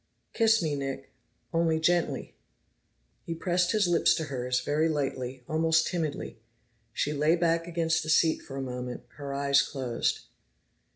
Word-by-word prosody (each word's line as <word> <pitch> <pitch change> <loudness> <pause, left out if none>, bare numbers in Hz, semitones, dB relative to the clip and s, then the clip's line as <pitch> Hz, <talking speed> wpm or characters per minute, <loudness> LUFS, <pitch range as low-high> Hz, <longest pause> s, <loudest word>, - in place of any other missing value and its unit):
"Kiss 225 -3 +3
me, 150 -2 0
Nick 135 -1 -5 0.4
only 165 -1 +2
gently." 175 +1 0 0.9
He 165 - -4
pressed 175 +1 +1
his 215 -4 +2
lips 175 -1 +4
to 160 - -2
hers, 125 -3 -1
very 155 +3 +1
lightly, 130 -4 -3
almost 160 +1 +2
timidly. 160 -9 -3 0.5
She 145 +5 -1
lay 150 +3 +3
back 165 -1 +1
against 165 -1 0
the 155 - -6
seat 160 +1 +4
for 135 - -9
a 135 - -3
moment, 125 -1 -5
her 140 -1 -6
eyes 140 0 +3
closed. 125 -4 -2
155 Hz, 150 wpm, -28 LUFS, 135-165 Hz, 0.9 s, lips